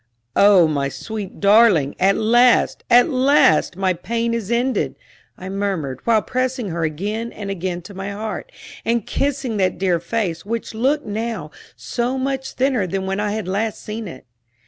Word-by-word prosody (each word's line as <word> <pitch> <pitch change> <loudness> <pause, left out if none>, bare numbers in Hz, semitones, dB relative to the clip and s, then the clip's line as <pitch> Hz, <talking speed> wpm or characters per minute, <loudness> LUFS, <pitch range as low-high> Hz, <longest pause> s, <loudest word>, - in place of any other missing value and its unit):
"Oh, 200 -4 +6
my 140 -3 -1
sweet 210 - -7
darling 200 -8 +5
at 195 +1 +3
last, 240 +3 +3
at 245 +3 +6
last, 265 - +3
my 190 -1 +1
pain 230 +6 -2
is 225 -4 -3
ended!" 245 +2 0 0.4
I 185 - -8
murmured, 190 -9 -3
while 225 -2 +3
pressing 255 -3 -2
her 170 0 -3
again 205 +9 -3
and 200 -2 -6
again 180 -2 -4
to 200 - -11
my 195 +1 -5
heart, 210 +2 -5 0.3
and 230 -2 0
kissing 270 -5 -1
that 185 -2 +1
dear 180 -3 +1
face, 175 -2 -2
which 230 +2 -4
looked 270 +7 0
now 210 -7 -4 0.2
so 245 +2 -2
much 265 0 -3
thinner 255 -7 +1
than 190 +2 -3
when 195 +1 -2
I 210 0 -1
had 215 -4 -4
last 210 +3 -2
seen 215 0 -5
it. 130 -7 -10
210 Hz, 170 wpm, -20 LUFS, 185-235 Hz, 0.4 s, Oh